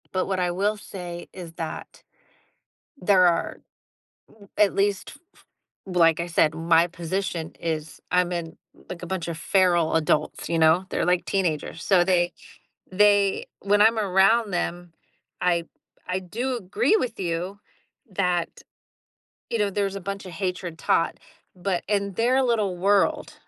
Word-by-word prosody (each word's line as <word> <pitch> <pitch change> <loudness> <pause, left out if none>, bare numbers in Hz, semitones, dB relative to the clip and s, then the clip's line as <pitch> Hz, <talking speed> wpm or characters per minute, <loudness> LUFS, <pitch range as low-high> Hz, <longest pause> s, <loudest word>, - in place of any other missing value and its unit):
But 185 -1 -1
what 190 -1 -1
I 180 -1 +1
will 205 +4 0
say 175 -4 -8
is 175 -3 -9
that, 165 -1 -7 1.0
there 185 -3 +5
are 170 -1 0 0.7
r 205 -2 -19
at 210 -2 +4
least, 200 0 0
f - - -22 0.2
f - - -23 0.5
like 170 -3 +3
I 170 - -2
said, 160 -2 +2
my 165 +1 +3
position 170 -1 -4
is 160 -1 -4
I'm 180 0 +2
in, 170 -2 -4 0.3
like, 180 -1 -7
a - - -5
bunch 180 -2 -3
of 165 - -4
feral 175 -2 +2
adults, 155 -1 0
you 170 - 0
know, 160 +3 +4
they're - - 0
like 180 0 +2
teenagers, 170 -3 -2
so 185 -3 +4
they 175 -1 +2 0.6
they 205 0 +3
when 205 +1 +2
I'm 225 +1 +4
around 205 +2 +3
them, 175 -1 -3 0.5
I 170 -2 +1 0.4
I 180 +1 0
do 240 +8 -3
agree 225 - +1
with 250 - -3
you 180 +3 -3 0.5
that, 180 -3 0 1.0
you 230 - -1
know, 205 -1 +1
there's 200 0 -1
a - - -5
bunch 195 +1 -6
of 185 - -9
hatred 180 -3 -4
taught, 165 - +1 0.4
but 180 -1 -2
in 200 -1 0
their 250 +6 +2
little 215 -7 0
world, 195 +2 +1
180 Hz, 155 wpm, -24 LUFS, 170-200 Hz, 1.0 s, there